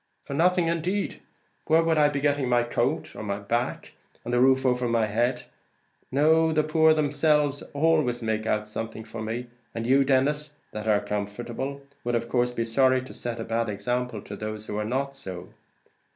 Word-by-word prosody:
"For - - -7
nothing 175 +3 +3
indeed! 175 +5 -1 0.5
Where 160 +1 +5
would 165 -1 +2
I 150 -1 +5
be 145 -1 -2
getting 145 -3 +1
the 120 -1 +3
coat 120 - -1
on 110 - -6
my 100 -1 -2
back, 120 +5 -2 0.3
and 120 - -3
the 120 - +3
roof 130 +1 +4
over 125 -1 +2
my 115 -1 +2
head? 120 +4 0 0.7
no, 160 +4 +4
the 155 -1 +2
poor 160 0 +4
themselves 150 -1 +2
always 145 -6 +2
make 110 0 -1
out 105 -1 0
something 110 +1 -5
for 115 0 -8
me; 115 +3 -3 0.3
and 115 0 -3
you, 135 +3 +5
Denis, 145 +3 +1 0.2
that 110 +1 -5
are 105 -1 +3
comfortable, 120 +7 -4 0.2
would 120 0 0
of 115 0 -1
course 125 0 +1
be 115 -1 -2
sorry 130 +2 +3
to 130 - -10
set 120 -1 -5
a - - -2
bad 115 0 -1
example 115 +2 -2
to 100 - -7
those 105 +1 -6
that 105 - -5
are 105 - -1
not 135 +4 -1
so." 95 -8 -8
125 Hz, 190 wpm, -26 LUFS, 115-145 Hz, 0.7 s, Where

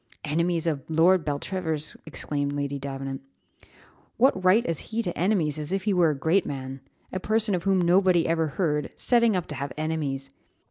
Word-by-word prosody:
"Enemies 170 +2 0
of 155 -4 0
Lord 165 +3 +4
Beltravers!" 155 +1 -3
exclaimed 145 0 -3
Lady 140 -1 -3
Davenant. 135 0 -5 1.0
"What 235 -7 +3
right 190 +6 +4
as 165 -3 -2
he 230 +1 -1
to 175 - -3
enemies 170 -6 +1
as 150 +2 -4
if 195 0 -1
he 210 0 +1
were 175 -3 +4
a 150 - -2
great 165 +7 +2
man? 135 -1 -6 0.3
a 185 - -1
person 215 +1 0
of 180 0 -2
whom 195 -1 +3
nobody 180 -1 +3
ever 165 -1 +1
heard, 150 -1 -1
setting 235 -3 +4
up 180 - -1
to - - -4
have 140 - -3
enemies! 145 -4 -2
165 Hz, 180 wpm, -26 LUFS, 145-185 Hz, 1.0 s, Lord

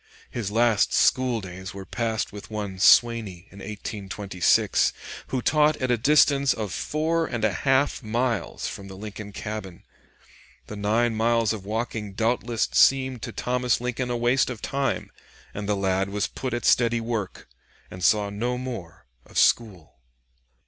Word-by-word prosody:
His 115 -5 -3
last 115 -1 +2
school 125 -3 +2
days 95 0 -8
were 95 -1 -7
passed 110 -2 -2
with 105 0 -9
one 100 -3 -5
Swaney 105 -4 +4
in 100 - -13
1826, 100 -3 0 0.3
who 130 -2 -2
taught 150 0 +3
at 130 -1 -1
a - - +4
distance 140 0 +4
of 105 -5 -4
four 160 +2 -1
and 115 -2 -1
a 105 - +1
half 135 +7 +1
miles 115 0 -2
from 100 - -7
the 95 -1 -10
Lincoln 105 0 -8
cabin. 100 -4 -7 0.8
The 105 - -8
nine 110 +3 +1
miles 115 0 +2
of 100 -3 -8
walking 110 -2 -3
doubtless 115 +2 0
seemed 130 -3 +3
to - - -5
Thomas 125 -1 0
Lincoln 125 +1 -3
a 120 - -1
waste 120 +3 +2
of 125 -3 -6
time, 135 -6 -2 0.4
and 105 0 -5
the 105 - +2
lad 95 0 0
was 105 +1 -1
put 125 -2 -4
at 120 - -4
steady 120 -1 +3
work 115 -4 -4 0.4
and 90 0 -8
saw 105 +2 +3
no 120 +5 -2
more 100 -8 -7 0.2
of - - -9
school. 95 - +1
110 Hz, 155 wpm, -25 LUFS, 100-125 Hz, 0.8 s, Swaney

